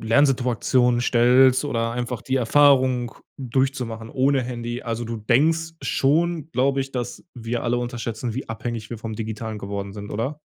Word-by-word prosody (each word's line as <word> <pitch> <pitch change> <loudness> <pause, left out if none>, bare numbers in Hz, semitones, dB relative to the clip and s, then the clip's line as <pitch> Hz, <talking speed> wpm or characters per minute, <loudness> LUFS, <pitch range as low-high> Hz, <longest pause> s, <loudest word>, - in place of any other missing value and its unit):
Lernsituationen 125 -1 +2
stellst 125 +3 +4
oder 115 -4 -1
einfach 120 -1 -4
die 130 - -2
Erfahrung 130 -1 +3 0.2
durchzumachen 125 -3 -2
ohne 135 0 +2
Handy. 120 0 -5
Also, 115 0 -3
du 115 0 -4
denkst 160 +9 +1
schon, 160 +3 +1
glaube 135 0 +1
ich, 135 - -4
dass 120 -2 -5
wir 120 -1 -3
alle 120 0 0
unterschätzen, 120 -1 -4
wie 130 - -5
abhängig 115 -1 -5
wir 120 - -5
vom 110 0 -5
Digitalen 110 0 -5
geworden 100 -1 -5
sind, 105 0 -8
oder? 130 +8 -3
120 Hz, 155 wpm, -23 LUFS, 115-135 Hz, 0.2 s, stellst